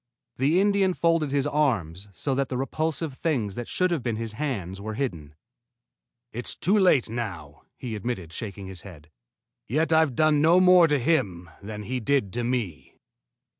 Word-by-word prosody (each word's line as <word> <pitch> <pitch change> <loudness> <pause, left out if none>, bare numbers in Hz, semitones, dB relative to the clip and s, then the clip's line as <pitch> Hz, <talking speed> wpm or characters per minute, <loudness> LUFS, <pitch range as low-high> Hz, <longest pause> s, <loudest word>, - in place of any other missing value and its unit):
The 145 +7 +3
Indian 200 -2 +2
folded 165 -3 +2
his 140 0 0
arms 110 - 0
so 135 +9 -2
that 135 0 -1
the 125 - -2
repulsive 155 +2 -2
things 130 - -1
that 120 +3 -6
should 185 -1 +1
have 165 -5 0
been 120 -2 -2
hands 110 - -4
were 110 +1 -5
hidden. 85 - -4 1.0
"It's 120 +2 -1
too 190 +6 +1
late 180 - +4
now," 95 -11 -6 0.2
he 120 -3 -5
admitted, 100 -6 -4
shaking 100 -4 -6
his 95 -1 -7
head. 80 -6 -13 0.6
"Yet 160 +6 +1
I've 160 -5 +3
done 155 0 +3
no 165 +4 +5
more 180 -2 +7
to 150 -1 +2
him 100 - 0
than 105 +1 -7
he 125 +4 -3
did 125 -5 0
to 120 - -2
me." 120 -10 -3
125 Hz, 170 wpm, -26 LUFS, 100-155 Hz, 1.0 s, more